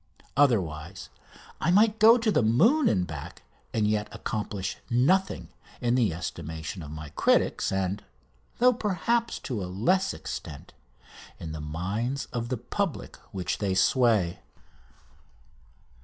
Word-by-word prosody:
Otherwise 95 - +1 0.5
I - - 0
might 210 +4 +4
go 225 +3 +8
to 225 -2 +1
the - - +3
moon 220 - +4
and 90 -3 +1
back 75 -4 -8 0.3
and 110 -2 +1
yet 105 0 0
accomplish 105 -3 -4
nothing 180 +11 +2 0.3
in 120 -1 +1
the 120 -7 +3
estimation 80 +1 -5
of 75 - -8
my 75 0 -7
critics 75 - +2
and 95 +1 -1 0.5
though, 250 +1 +5
perhaps, 230 +2 0
to 115 -8 -3
a 90 - -5
less 180 - +1
extent 70 - -7 0.7
in 80 - -6
the 80 -1 -6
mind 100 - -3
of 120 -1 -3
the 130 - -1
public 170 - -3 0.2
which 95 -2 -3
they 95 -3 0
sway. 105 -4 +3
110 Hz, 130 wpm, -27 LUFS, -, 0.7 s, go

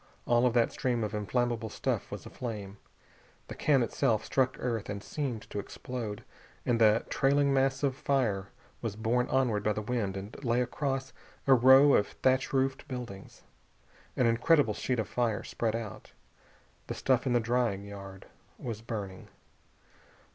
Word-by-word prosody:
All 120 +1 +4
that 120 -1 +2
stream 125 -5 -1
of 105 0 -3
inflammable 115 +2 -1
stuff - - -2
was - - -7
aflame. 105 -5 -6 0.7
The - - -5
can 140 -4 +3
itself 115 -2 0
struck 130 -1 +1
earth 115 -3 -3
and 100 0 -4
seemed 130 -8 -3
to 105 - -3
explode, 110 0 -6 0.4
and 115 -2 +1
the 110 0 +5
trailing 140 +1 +3
mass 135 +1 +1
of 135 -2 +1
fire 115 -9 0 0.3
was 115 -4 -3
borne 120 +3 +1
onward 125 -6 +1
by 105 - +2
the 105 - -3
wind 105 -4 -2
and 100 +8 -8
lay 120 -1 +2
across 135 +1 -2 0.3
a 135 - +6
row 130 +3 +7
of 100 - +4
thatch 130 +1 +1
roofed 135 +2 0
buildings. 120 -8 -8 0.7
An 125 - +3
incredible 115 +1 +3
sheet 125 +4 -1
of 110 -3 -1
fire 120 -4 0
spread 115 -1 -2
out. 110 -4 -7 0.7
The - - -4
stuff 130 0 +1
in 125 - +2
the 120 - +4
drying 115 -4 0
yard 100 -1 -9 0.3
was 115 -3 -5
burning. 105 -5 -6
120 Hz, 155 wpm, -30 LUFS, 105-130 Hz, 0.7 s, row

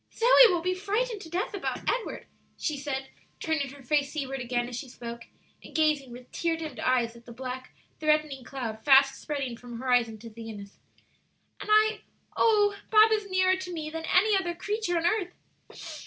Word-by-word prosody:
"Zoe 465 - 0 0.2
will 345 -2 0
be 365 +1 +1
frightened 415 +4 -2
to 325 - -10
death 365 +6 -2
about 400 - -4
Edward," - - -2 0.3
she 305 - -2
said, 270 -1 -4 0.3
turning 315 -4 -1
her 280 0 -13
face 285 +2 +1
seaward 270 -3 -4
again 240 -1 -1
as 245 - -6
she 255 +2 -6
spoke, 235 -1 -8 0.4
and - - -13
gazing 305 -4 +2
with 245 +1 -12
tear 335 -1 -1
dimmed 320 -2 -7
eyes 240 -2 +1
at 235 0 -16
the - - -9
black, 255 +1 -6 0.3
threatening 305 -3 +1
cloud 230 -5 -6
fast 270 -1 +5
spreading 275 -5 -3
from 240 0 -9
horizon 245 -3 +1
to 225 +1 -11
zenith, 215 -3 -9 0.8
"and - - -8
I 430 0 +4 0.3
oh, 415 -2 +4
Bob 435 0 +7
is 420 -2 0
nearer 370 0 +3
to 375 -1 -6
me 310 -3 -5
than 325 0 -5
any 405 +5 +4
other 350 -3 -1
creature 410 -1 -2
on 335 - -1
earth!" 360 -1 0
300 Hz, 185 wpm, -28 LUFS, 250-370 Hz, 0.8 s, Bob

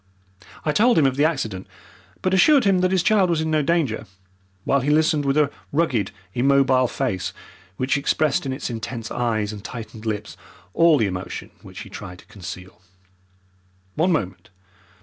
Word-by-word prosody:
I 155 - +2
told 235 +10 +4
him 155 - +5
of 130 -1 +2
the 145 +2 +3
accident, 110 - -2 0.6
but 185 - +1
assured 275 - +5
him 195 -3 +3
that 185 0 +2
his 185 -1 +1
child 195 -2 +3
was 170 -2 +1
in 160 0 -1
no 155 -1 +3
danger, 140 -8 0 0.6
while 140 - +2
he 135 +2 -1
listened 155 -1 +2
with 140 +1 +1
a 145 -2 +3 0.2
rugged, 140 - +1 0.2
immobile 135 0 +3
face, 95 -5 -2 0.4
which 130 +2 +1
expressed 140 0 +1
in - - -2
its 130 -1 -4
intense 115 0 -5
eyes 110 -3 -1
and 100 -1 -9
tightened 115 -1 -8
lips 105 -1 -3 0.4
all 165 -2 +5
the 110 - +2
emotion 90 -2 -5
which - - -10
he - - -10
tried 90 - -8
to - - -17
conceal. 90 -1 -10 1.1
"One 170 +4 +1
moment! 95 - -2
135 Hz, 170 wpm, -22 LUFS, 110-160 Hz, 1.1 s, him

